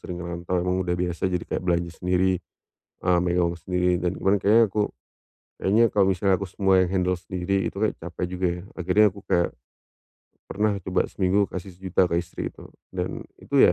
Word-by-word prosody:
sering 90 - -6
ngerantau 85 +1 -3
emang 90 +1 0
udah 90 0 0
biasa 90 +1 -1
jadi 90 -1 -2
kayak - - -3
belanja 85 -1 0
sendiri, 90 0 +2 0.6
eee, 90 -1 +3
megang 85 -1 +1
sendiri 90 +1 +1
dan 90 +1 -1
kemarin 100 +1 +2
kayaknya 110 +4 +5
aku, 105 +1 +1 0.7
kayaknya 110 +5 +3
kalau 100 -2 +5
misalnya 95 +1 +2
aku - - -3
semua 95 0 +3
yang 90 - -3
handle 90 -1 +1
sendiri 95 +2 -2
itu - - -32
kayak 110 0 +1
capek 85 +1 -4
juga 90 0 -1
ya. - - -8
Akhirnya 95 +4 +3
aku 100 - -11
kayak 85 0 +2 1.0
pernah 105 +1 0
coba 95 0 0
seminggu 95 +1 +1
kasih 95 +1 -7
Rp1.000.000 95 0 +1
ke 85 - -2
istri 85 0 -6
itu - - -13 0.3
dan - - -4 0.2
itu - - -3
ya, - - +6
90 Hz, 190 wpm, -25 LUFS, 90-95 Hz, 1.0 s, ya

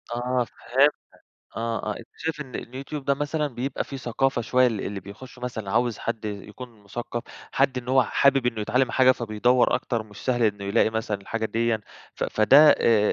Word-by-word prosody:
آه 125 0 0 0.2
فهمتك، 140 +4 +4 0.6
آه 115 -1 -2
آه، - - -8
أنت 115 - -12
شايف 160 -1 -4
إن 135 -4 -8
اليوتيوب 135 +3 -6
ده 140 - +2
مثلًا 145 +2 -1
بيبقى 130 0 -3
فيه 135 - -7
ثقافة 130 +1 0
شوية، 130 +2 +3
ال 110 -5 -1
اللي 100 0 -4
بيخشوا 115 +6 -12
مثلًا 110 -5 -4
عاوز 120 0 +1
حد 115 -2 -4
يكون 105 +2 -8
مثقف، 120 +3 -5 0.3
حد 135 -1 +2
إن 125 0 -8
هو 130 0 +5
حابب 135 0 +2
إنه 115 -3 -1
يتعلم 125 +4 +1
حاجة 130 -1 +5
فبيدوّر 120 +2 +2
أكتر، 115 -2 -1
مش 105 -2 -16
سهل 120 -2 +1
إنه 105 -2 +1
يلاقي 105 +2 +2
مثلًا 110 -2 -2
الحاجة 115 +3 -4
ديًّا، 115 0 0 0.3
ف - - -2
فده 135 +8 +6
آآ، 105 -2 +3
120 Hz, 185 wpm, -25 LUFS, 110-130 Hz, 0.6 s, فده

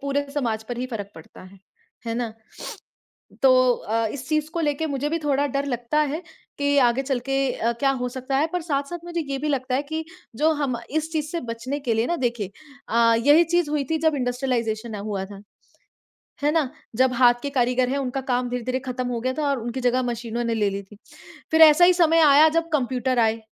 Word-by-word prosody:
पूरे 280 +1 -1
समाज 230 -6 -1
पर 245 -1 -4
ही 250 - -2
फ़र्क 210 -5 -6
पड़ता 160 - -13
है, 185 +1 -15 0.5
है 230 - -2
ना? 235 -2 -3 1.1
तो 255 -2 +5
अ 225 +1 -2
इस 265 -2 -7
चीज़ 305 0 0
को 340 - -2
लेके 300 0 0
मुझे 285 0 -2
भी 330 - 0
थोड़ा 285 -1 +1
डर 275 +1 -2
लगता 245 +2 -1
है 300 +3 0 0.4
कि 285 0 +1
आगे 245 0 +4
चल 270 -2 -1
के 270 +1 0
अ, 235 -1 -1
क्या 275 - +3
हो 250 -2 -2
सकता 260 +1 -3
है, 300 +3 +2
पर 360 - 0
साथ-साथ 295 +1 -3
मुझे 345 -1 -3
ये 275 - -1
भी 295 +3 -3
लगता 260 -3 -1
है 275 - +1
कि 315 +2 -4 0.3
जो 310 +6 +3
हम 255 -4 -1
इस 315 +2 -2
चीज़ 305 -2 -1
से 340 - -2
बचने 255 +5 -4
के 245 -5 -1
लिए 225 +1 +1
ना 345 - 0
देखिए 235 - -2 0.4
अ, 230 0 +4
यही 305 +4 +7
चीज़ 345 -1 0
हुई 295 -1 0
थी 320 - +2
जब 315 - +2
इंडस्ट्रियलाइजेशन 245 -4 -2
हुआ 200 -2 -4
था, 200 0 -11 1.0
है 295 - +3
ना? 305 -6 +1 0.3
जब 260 +1 +3
हाथ 240 0 +5
के 285 - -3
कारीगर 250 -1 +1
हैं 275 - -1
उनका 270 0 -2
काम 250 -1 -1
धीरे-धीरे 250 +1 -2
ख़त्म 255 0 -3
हो 240 -2 -2
गया 255 +2 -1
था 295 - 0
और 280 -1 0
उनकी 240 +3 -4
जगह 250 +1 +2
मशीनों 235 -1 -3
ने 230 -1 0
ले 210 -2 +1
ली 200 0 -4
थी। 200 +2 -17 0.6
फिर 320 0 +4
ऐसा 320 +2 +8
ही 365 - +6
समय 330 -2 +4
आया 300 0 +7
जब 330 +1 -1
कंप्यूटर 255 -2 0
आए, 225 0 +2
260 Hz, 220 wpm, -23 LUFS, 240-290 Hz, 1.1 s, ऐसा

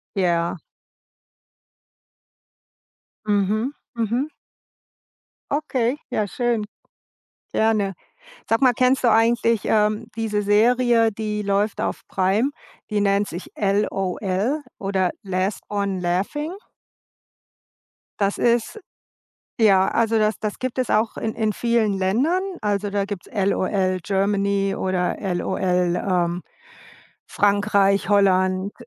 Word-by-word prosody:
Ja. 170 -2 0 2.7
Mhm, 210 +5 +1 0.2
mhm. 235 +5 -1 1.2
Okay, 270 -3 0
ja, 210 - 0
schön. 235 0 -1 0.9
Gerne. 215 -3 +1 0.6
Sag 225 +4 +1
mal, 255 - +6
kennst 255 +2 +2
du 240 - +5
eigentlich, 230 -1 +3
ähm, 215 +1 +1
diese 220 -2 -1
Serie, 230 +2 +3
die 210 0 -3
läuft 200 +1 0
auf - - -2
Prime, 195 +8 +1 0.4
die 210 -2 0
nennt 200 0 +2
sich 175 - -7
„LOL“ 200 - 0 0.2
oder 190 -2 0
„Last 190 0 -2
one 200 -2 -2
Laughing?“ 195 - -1 1.7
Das 200 -1 +1
ist 240 - +1 0.8
ja, 195 -4 +5
also 225 -1 +2
das 215 0 +1
das 215 -1 -4
gibt 255 0 -4
es 255 - 0
auch 215 +1 +1
in 220 - -3
in 220 -2 0
vielen 235 -3 +1
Ländern, 235 - +1 0.2
also 205 -1 -1
da 200 0 0
gibt's 200 -3 -6
LOL 190 -2 0
Germany 195 0 0
oder 185 -1 -1 0.2
LOL, 180 +1 -2 0.4
ähm, 180 -2 0 0.8
Frankreich, 200 -1 +2
Holland, 190 -1 +3
205 Hz, 105 wpm, -22 LUFS, 195-225 Hz, 2.7 s, mal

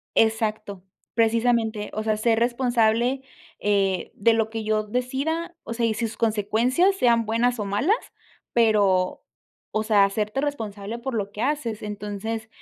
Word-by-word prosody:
Exacto, 215 -3 0 0.3
precisamente, 225 -2 +1
o 215 - -2
sea, 215 -1 0
ser 225 +1 +2
responsable 240 +1 +2 0.4
eh, 195 -3 +1
de 230 +3 +3
lo 225 -1 +1
que 225 -1 -4
yo 215 0 +1
decida, 270 +10 -2
o 230 - -5
sea, 230 0 0
y 220 - -1
sus 225 0 -3
consecuencias, 230 - +2
sean 235 -9 +3
buenas 235 +2 +1
o 210 - -2
malas, 210 - +2 0.6
pero, 200 -5 +2 0.5
o 215 - 0
sea, 210 -2 +5
hacerte 210 +4 -2
responsable 225 -6 -4
por 260 0 -4
lo 200 -2 -2
que 210 - -6
haces. 250 -6 -1
Entonces 210 +1 -5
225 Hz, 145 wpm, -24 LUFS, 210-240 Hz, 0.6 s, sea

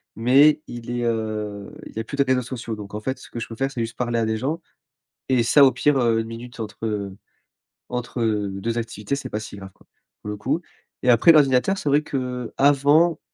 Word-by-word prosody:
mais 140 +6 +5
il 120 -1 -8
est, 120 0 -2
heu, 110 -3 -3
il - - -12
y - - -3
a - - -2
plus 140 - -7
de 140 - +4
réseaux 130 -1 +1
sociaux. 120 -2 -5
Donc, 105 -1 -9
en - - -3
fait, 130 +4 -4
ce - - -13
que 120 - -6
je 115 - -5
peux 115 - -8
faire, 135 +3 -1
c'est 120 - -4
juste 115 0 -4
parler 120 -1 -1
à 115 - +1
des 110 0 -1
gens 145 +8 -2 0.7
et 125 -2 +4
ça, 140 +5 +6
au 130 - +5
pire, 140 +2 +2
heu, 115 -2 +2
1 115 - -4
minute 115 +1 -9
entre, 110 +1 -6
heu, 100 -3 -3 0.7
entre, 125 0 -4
heu, 105 -3 0
2 115 +3 -2
activités, 115 +2 -3
c'est 140 - -6
pas 105 - -3
si 110 -1 -8
grave, 95 -1 -9
quoi, - - -25 0.4
pour - - -7
le 105 - -4
coup 145 +10 -1 0.4
et 125 - +4
après, 120 +8 +6
l'ordinateur, 145 +4 +4
c'est 150 - -2
vrai 145 +2 +4
qu'avant, 140 +4 +2
120 Hz, 235 wpm, -23 LUFS, 110-135 Hz, 0.7 s, ça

